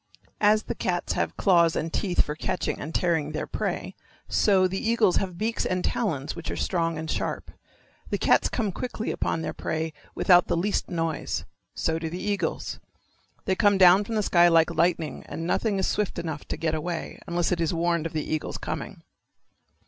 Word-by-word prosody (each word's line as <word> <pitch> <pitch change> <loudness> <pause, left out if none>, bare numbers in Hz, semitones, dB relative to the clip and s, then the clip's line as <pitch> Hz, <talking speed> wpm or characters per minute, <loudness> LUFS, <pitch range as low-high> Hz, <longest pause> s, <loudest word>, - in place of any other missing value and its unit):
As 215 +1 +4
the - - -3
cats 175 -1 -1
have - - -2
claws 170 -3 +4
and 165 +1 -2
teeth 185 -4 +2
for 150 - -4
catching 155 - -2
and 155 - -5
tearing 165 -4 0
their - - -2
prey - - -3 0.3
so 190 -3 +3
the 190 +1 -3
eagles 225 -4 +3
have 185 -3 -2
beaks 225 +4 -1
and 185 0 -1
talons 155 - -1
which 170 - -6
are - - -3
strong 165 -3 -1
and 160 0 -5
sharp. - - -3 0.6
The - - 0
cats - - +3
come 215 -5 -1
quickly 225 +2 -4
upon 160 - -2
their - - -3
prey 160 0 -3 0.2
without 180 -1 +5
the - - 0
least 200 +5 0
noise. 165 -2 -2 0.3
So 160 0 0
do 165 -1 -3
the 175 - -5
eagles. 205 +1 -2 0.7
They 190 - +2
come 205 0 +3
down 185 +1 +7
from 225 +2 -4
the 215 - +1
sky 175 -2 +5
like 165 0 +4
lightning 165 -1 0
and 165 - -5
nothing 205 +3 0
is 190 - 0
swift 210 -2 -1
enough 160 -3 -4
to - - -3
get 160 -1 -1
away, 165 +2 -4
unless 170 0 0
it 175 -1 0
is 165 - +1
warned 170 -1 0
of - - -12
the 155 -1 -2
eagle's 155 -1 -2
coming. - - -6
175 Hz, 195 wpm, -26 LUFS, 165-195 Hz, 0.7 s, down